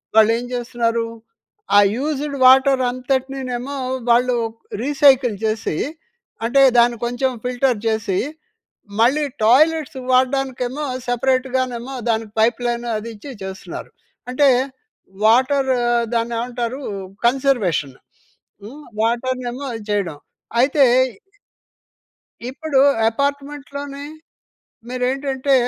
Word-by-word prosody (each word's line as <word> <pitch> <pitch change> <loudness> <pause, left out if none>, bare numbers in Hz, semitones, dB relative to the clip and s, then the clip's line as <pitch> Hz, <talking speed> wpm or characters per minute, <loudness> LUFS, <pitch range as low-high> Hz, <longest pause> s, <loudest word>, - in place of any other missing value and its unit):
వాళ్ళు 220 0 +6
ఏం 245 - -6
జేస్తున్నారు 235 -1 -1 0.7
ఆ - - +9 0.2
యూజ్‌డ్ 290 +1 -2
వాటర్ 265 +1 +6
అంతటినినేమో 260 0 -3 0.4
వాళ్ళు 245 +1 +3 0.5
రీసైకిల్ 270 -4 +4
చేసి, 215 -7 -1 0.7
అంటే 275 +4 +3 0.2
దాన్ని 235 0 +3
కొంచెం 245 +2 0
ఫిల్టర్ 250 -1 0
చేసి 220 -4 0 0.8
మళ్ళీ 270 +6 +3 0.2
టాయిలెట్స్‌కి 290 +3 +3
వాడడానికే 260 0 +1
ఏమో 290 +4 -5 0.2
సెపరేట్‌గానేమో 255 0 -1 0.2
దానికి 220 -1 -1
పైప్ 230 +2 +3
లైన్ 240 0 -1
అది 220 +2 -6
ఇచ్చి 275 +7 -10
చేస్తున్నారు. 190 0 -7 0.4
అంటే 280 +3 +3 0.8
వాటర్ 265 +4 +3 0.4
దాన్ని 235 0 0
ఏమంటారు? 245 +1 -3 0.5
కన్జర్వేషన్ 235 - +1 0.7
హ్మ్. 265 +9 -10 0.2
వాటర్‌నేమో 250 +3 -2
ఇది 210 - -12
చేయడం. 190 -7 -1 0.4
అయితే 275 +2 +4 1.7
ఇప్పుడు 285 0 -1 0.3
అపార్ట్మెంట్‌లోనే, 280 +2 -4 0.8
మీరేంటంటే 265 +2 0
255 Hz, 90 wpm, -20 LUFS, 235-275 Hz, 1.7 s, ఆ